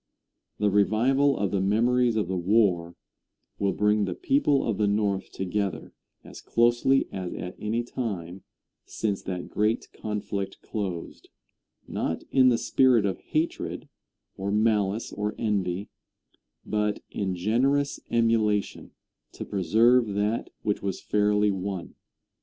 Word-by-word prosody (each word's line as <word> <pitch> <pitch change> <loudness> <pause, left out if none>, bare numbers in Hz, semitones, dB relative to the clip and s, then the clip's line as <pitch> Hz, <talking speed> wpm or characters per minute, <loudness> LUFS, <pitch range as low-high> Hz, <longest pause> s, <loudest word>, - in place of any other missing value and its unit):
The 105 -1 +1
revival 120 +8 +3
of 100 -2 -1
the 100 - 0
memories 120 +4 +2
of 105 -5 0
the 95 - -2
war 90 -3 +2 0.6
will 100 -1 +1
bring 105 0 +2
the 90 -2 -3
people 270 - +2
of 110 -3 -1
the 105 - +3
North 100 -2 0
together 95 0 -3 0.3
as - - -11
closely 120 +3 +2
as 95 -2 -5
at 90 - -6
any 115 +3 -1
time 95 -8 -5 0.4
since 100 -3 -3
that 90 -2 -5
great 105 +2 0
conflict 105 -2 -4
closed, 95 -6 -5 0.6
not 80 - -3
in 130 -1 +6
the 120 - +3
spirit 125 -5 +3
of 95 -2 -1
hatred, 160 +2 -3 0.5
or 95 +1 -2
malice 105 0 +1
or 105 +1 -3
envy, 100 -3 -1 0.7
but 105 0 -1
in 95 -2 -2
generous 130 +10 +1
emulation 115 -3 +1 0.4
to - - -7
preserve 110 +4 +3
that 105 +3 -1
which 105 - -1
was 95 -2 -3
fairly 105 0 +2
won. 95 -2 -4
105 Hz, 130 wpm, -26 LUFS, 95-115 Hz, 0.7 s, in